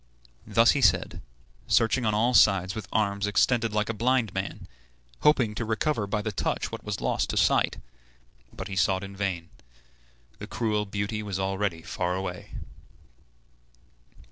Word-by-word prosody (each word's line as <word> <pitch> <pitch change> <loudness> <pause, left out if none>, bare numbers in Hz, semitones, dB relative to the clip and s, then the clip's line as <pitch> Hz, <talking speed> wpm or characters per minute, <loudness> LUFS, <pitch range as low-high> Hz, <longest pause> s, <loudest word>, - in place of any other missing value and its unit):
Thus 115 +2 +5
he 140 - 0
said, 95 -5 +2 0.5
searching 115 +1 +2
on 105 - +1
all 120 +4 +2
sides 95 -5 +4
with 110 -3 -6
arms 100 -2 0
extended 115 +2 +2
like 105 0 0
a 115 - -2
blind 115 -2 +1
man, 95 +1 -5 0.5
hoping 130 -8 +3
to 115 - -3
recover 110 +1 -1
by 105 +1 -2
the 110 - -2
touch 95 - -2
what - - -7
was - - -4
lost - - 0
to - - -2
sight; - - +3 0.7
but - - -7
he 100 - -6
sought 95 +1 +1
in 100 0 -8
vain. 95 -4 -3 0.9
The - - -7
cruel 105 -1 -1
beauty 100 +2 -3
was 100 -3 -4
already 95 -3 -2
far 90 0 -2
away. 90 -1 -5
105 Hz, 155 wpm, -27 LUFS, 95-110 Hz, 0.9 s, Thus